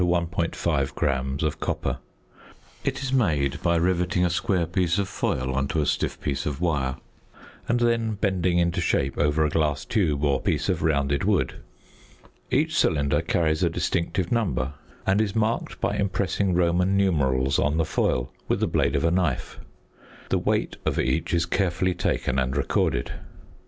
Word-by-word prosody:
5 70 -5 -1
gram 65 -1 0
of 75 -2 -1
copper. - - -2 0.8
It - - -2
is 135 -1 -2
made 75 - +1
by 85 -1 +2
rivetting 90 +1 +1
a 90 - +1
square 90 0 +1
piece 90 +1 0
of 100 -1 0
foil 65 -8 -2
on 70 +1 0
to 80 - -1
a 75 - +1
stiff - - -1
piece 70 -1 -2
of 75 -1 -3
wire, 70 -7 0 0.7
and 120 +1 +2
then 115 -2 +1
bending 95 -3 +1
into 85 -1 +1
shape 70 0 0
over 75 +1 +2
a 75 - -1
glass 75 -2 0
tube 75 -9 0
or 70 -3 +2
piece - - 0
of - - 0
rounded 70 -2 +1
wood. 100 -3 +1 0.9
Each - - +1
cylinder 70 -2 +2
carries 80 -2 0
a - - +3
distinctive 85 +1 -1
number, 90 - 0 0.3
and 95 +2 +3
is 100 -3 -1
marked 110 +1 -1
by - - 0
impressing 95 -1 0
Roman 90 +2 +2
numerals 70 -8 +2
on 75 +2 +1
the 80 - +2
foil 65 -3 0
with - - +1
the - - +2
blade - - +1
of - - +1
a 85 - +3
knife. 90 0 -1 0.7
The - - +2
weight - - -1
of - - -1
each 65 +5 0
is 85 -1 +2
carefully 90 0 0
taken 65 -6 -1
and 65 +1 -1
recorded. - - 0
85 Hz, 165 wpm, -25 LUFS, 70-95 Hz, 0.9 s, a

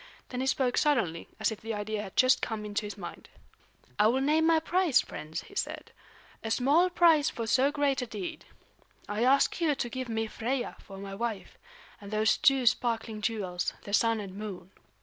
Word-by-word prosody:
Then 250 0 -3
he 265 - -1
spoke 260 -2 +1
suddenly, 230 - +1
as 215 +1 +1
if 220 - -7
the 225 0 -4
idea 210 0 -3
had 195 -3 -9
just 255 +1 +5
come 220 -2 -3
into 210 0 -2
his 205 - -8
mind. 175 -3 -9 0.7
"I 210 - +6
will 250 +4 +2
name 305 +4 +3
my 325 -1 +5
price, 340 -2 +2
friends," 155 +1 -5
he - - -16
said; - - -4 0.5
"a 225 - -3
small 285 +10 +3
price 330 -4 +4
for 230 - -5
so 260 +5 +3
great 285 -2 +1
a 250 - -4
deed. 205 -5 -6 0.6
I 210 +2 -1
ask 275 +6 +3
you 310 -4 +2
to 245 -3 -3
give 255 0 -5
me 225 0 -1
Freia 240 +4 -3
for 195 - -11
my 195 0 -7
wife, 220 -1 -4 0.5
and 200 - -9
those 215 +1 +2
two 270 -2 +4
sparkling 230 -2 0
jewels, 195 -6 -2
the 200 - -8
Sun 230 +1 +3
and 195 -3 -7
Moon." 195 -3 -7
230 Hz, 195 wpm, -29 LUFS, 210-270 Hz, 0.7 s, I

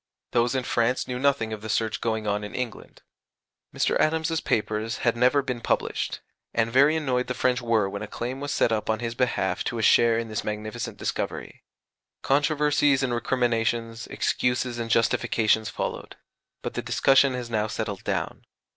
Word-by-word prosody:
Those 120 +2 +2
in 130 - 0
France 120 +1 0
knew 125 0 -3
nothing 130 -5 +1
of 105 - -6
the 110 - -7
search 110 +1 0
going 110 -1 -1
on 105 0 -1
in 105 - -7
England. 125 -3 -6 0.7
Mr. - - 0
Adams's 160 +1 +1
papers 110 +1 -1
had 115 - +3
never 125 +4 +3
been 125 -3 -4
published; - - -1 0.3
and 115 0 +1
very 140 +5 +5
annoyed 130 -5 0
the 125 - -3
French 125 0 +1
were 115 -4 +2
when 100 +1 -5
a 105 - -5
claim 125 +5 -5
was 145 0 -4
set 120 - +2
up 110 -1 -1
on 110 - +2
his 115 +1 -3
behalf 125 +1 0
to 120 - -2
a 110 - -2
share 115 +1 +5
in 115 0 -2
this 110 -1 -3
magnificent 110 +1 -4
discovery. - - -4 0.6
Controversies 145 -1 +2
and 125 -2 0
recriminations, 115 -2 -1
excuses 125 -1 -1
and 115 -1 -3
justifications, 110 -1 +2
followed; - - -5 0.5
but - - -4
the - - -2
discussion 135 -1 +3
has 120 -2 -5
now 110 -1 +1
settled 105 -3 -4
down. - - -3
120 Hz, 175 wpm, -26 LUFS, 110-130 Hz, 0.7 s, very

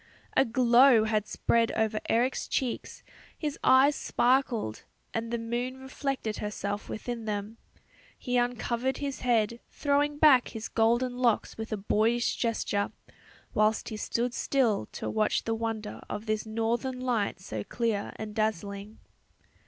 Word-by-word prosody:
A 270 - +5
glow 240 0 +5
had 215 -1 0
spread 230 -1 +1
over 220 -1 0
Eric's 245 +3 +1
cheeks, 255 -3 -3 0.3
his 300 -2 -3
eyes 270 +3 +6
sparkled, 240 - +1 0.3
and 225 0 -2
the 235 - -1
moon 240 +3 -3
reflected 265 -4 -3
herself 205 0 -4
within 230 0 -5
them. 210 +1 -4 0.6
He 250 -1 -3
uncovered 245 +1 0
his 280 -2 -4
head, 235 -2 +1
throwing 290 0 +1
back 290 -5 +6
his 225 -1 -6
golden 240 +2 +2
locks 240 -4 +1
with 220 +1 -6
a 215 - -1
boyish 220 +4 +1
gesture, 215 -3 -1 0.6
whilst 215 +1 +2
he 220 - -5
stood 240 +3 -1
still 245 -9 +1
to - - -5
watch 215 -1 +1
the 225 - -1
wonder 225 -2 -4
of 210 +1 -5
this 215 0 -1
northern 230 +3 -1
night 240 -7 -1
so 110 - -5
clear 225 - -2
and 215 -1 -6
dazzling. 205 -1 -2
230 Hz, 140 wpm, -29 LUFS, 215-250 Hz, 0.6 s, eyes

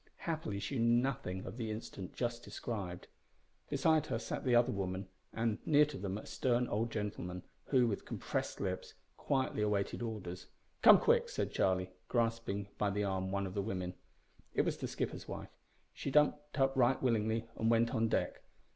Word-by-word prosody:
Happily 155 -12 -2
she 125 +6 -2
knew 115 +1 +5
nothing 125 -8 -2
of 100 +5 -7
the 115 -3 -3
incident 105 -4 -6
just 120 -1 -2
described. 95 -7 -5 0.6
Beside 160 -2 +3
her - - 0
sat 115 - -4
the 125 -2 +3
other 120 0 +5
women, 95 -1 -3 0.2
and, 115 -2 0
near 150 -1 +6
to 145 -2 -7
them, 100 0 -2
a - - -8
stern 125 -1 +1
old 115 +3 0
gentleman, 95 -4 -4 0.2
who, 130 -3 +4
with 105 -4 -1
compressed - - -3
lips, - - -3 0.2
quietly 130 -5 0
awaited 105 0 0
orders. 105 -6 -5 0.3
"Come, - - +10
quick!" - - +3
said - - -2
Charlie, 95 -1 +1 0.2
grasping 115 -4 0
by 105 - +2
the 105 +1 0
arm 95 -1 -1
one 100 0 0
of 95 - -5
the 100 - 0
women. 90 -3 -3 0.6
It - - +4
was - - -1
the - - -3
skipper's - - -3
wife. - - -7 0.4
She - - -4
jumped 150 +1 +2
up 135 0 +3
right 130 0 +4
willingly 115 -2 +1
and 110 - +1
went 115 0 +3
on 115 0 +2
deck. - - 0
115 Hz, 180 wpm, -35 LUFS, 100-125 Hz, 0.6 s, Come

